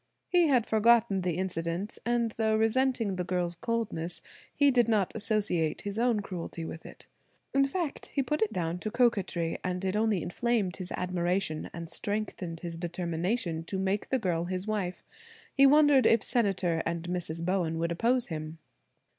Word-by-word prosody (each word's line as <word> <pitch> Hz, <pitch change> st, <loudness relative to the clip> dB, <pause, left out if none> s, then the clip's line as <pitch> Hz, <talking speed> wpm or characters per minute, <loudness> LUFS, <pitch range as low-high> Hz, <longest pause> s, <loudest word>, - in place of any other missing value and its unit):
He 350 Hz, -2 st, +4 dB
had 250 Hz, -6 st, +3 dB
forgotten 220 Hz, -2 st, +4 dB
the 175 Hz, -2 st, -1 dB
incident; 180 Hz, +1 st, -3 dB
and 235 Hz, -1 st, +1 dB
though 220 Hz, 0 st, +1 dB
resenting 225 Hz, -2 st, +1 dB
the 180 Hz, -, -1 dB
girl's 180 Hz, -1 st, -1 dB
coldness, 190 Hz, -4 st, -3 dB, 0.3 s
he 285 Hz, -1 st, +4 dB
did 240 Hz, -3 st, +3 dB
not 210 Hz, -5 st, +1 dB
associate 210 Hz, -7 st, 0 dB
his 205 Hz, +2 st, -4 dB
own 235 Hz, -3 st, +2 dB
cruelty 175 Hz, -3 st, -6 dB
with 160 Hz, -, -8 dB
it. -, -, -13 dB, 0.5 s
In 275 Hz, 0 st, +4 dB
fact, 325 Hz, +1 st, -3 dB
he 275 Hz, -, -1 dB
put 300 Hz, +4 st, -1 dB
it 220 Hz, 0 st, +2 dB
down 175 Hz, -3 st, -2 dB
to 215 Hz, -, -3 dB
coquetry, 205 Hz, -8 st, +1 dB
and 180 Hz, 0 st, -2 dB
it 190 Hz, +1 st, 0 dB
only 215 Hz, -4 st, +1 dB
inflamed 210 Hz, 0 st, 0 dB
his 185 Hz, -1 st, -7 dB
admiration 180 Hz, -2 st, -1 dB
and 170 Hz, 0 st, -7 dB
strengthened 180 Hz, -2 st, -4 dB
his 170 Hz, -2 st, -5 dB
determination 175 Hz, +1 st, -2 dB
to 190 Hz, -, -3 dB
make 190 Hz, +2 st, -1 dB
this 260 Hz, -, +1 dB
girl 175 Hz, -4 st, 0 dB
his 185 Hz, +1 st, -3 dB
wife. 205 Hz, -4 st, -2 dB, 0.5 s
He 275 Hz, 0 st, +6 dB
wondered 290 Hz, -2 st, +6 dB
if 230 Hz, -, +4 dB
Senator 190 Hz, -8 st, +1 dB
and 170 Hz, 0 st, -2 dB
Mrs. 170 Hz, -2 st, -3 dB
Bowen 175 Hz, -3 st, 0 dB
would 170 Hz, +1 st, -1 dB
oppose 235 Hz, +8 st, +2 dB
him? 155 Hz, -3 st, -6 dB
195 Hz, 170 wpm, -29 LUFS, 170-230 Hz, 0.5 s, He